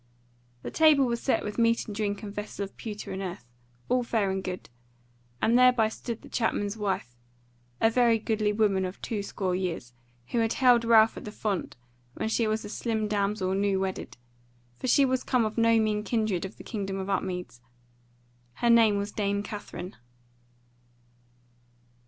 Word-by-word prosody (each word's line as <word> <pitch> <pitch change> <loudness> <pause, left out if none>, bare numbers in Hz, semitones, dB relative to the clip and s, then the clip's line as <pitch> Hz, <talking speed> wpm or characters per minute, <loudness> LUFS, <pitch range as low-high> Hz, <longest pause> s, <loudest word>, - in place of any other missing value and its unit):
The - - -5
table 310 -4 +5
was 235 -1 -2
set 270 - +1
with 210 +2 -4
meat 230 0 +3
and 210 - -7
drink 205 0 -2
and 200 -1 -6
vessel 205 -1 -5
of 195 - -8
pewter 210 -2 -7
and 190 0 -4
earth, 180 -9 -6 0.4
all 250 0 +2
fair 220 -5 0
and 190 0 -2
good; 185 -1 -5 0.8
and 230 - +4
thereby 250 -3 +5
stood 230 +1 -6
the - - -11
chapman's 205 -3 -1
wife, 195 - -3 0.6
a 225 - +4
very 235 -1 +4
goodly 215 -1 0
woman 205 -3 +2
of 185 +1 -5
two 215 -3 -2
score 190 -2 -2
years, 175 -10 -3 0.4
who 235 - 0
had 225 0 +1
held 245 -3 +5
Ralph 225 -1 +5
at - - -8
the 210 - -6
font 210 -3 -3 0.4
when 220 - -2
she 225 0 +1
was 215 0 -1
a - - -5
slim 220 -1 -2
damsel 200 -2 0
new 195 0 +1
wedded; 190 -8 -4 0.6
for - - -3
she 275 +3 +5
was 260 -1 0
come 250 -3 +2
of 215 - -3
no 230 -1 +4
mean 210 -1 0
kindred 215 -6 0
of 190 - -9
the - - -10
Kingdom 195 -3 -4
of 190 0 -4
Upmeads: 180 -9 -3 0.9
her 235 - +2
name 225 -3 +5
was 200 +1 -3
Dame 200 -1 -1
Katherine. 200 -3 -7
210 Hz, 175 wpm, -28 LUFS, 195-230 Hz, 0.9 s, table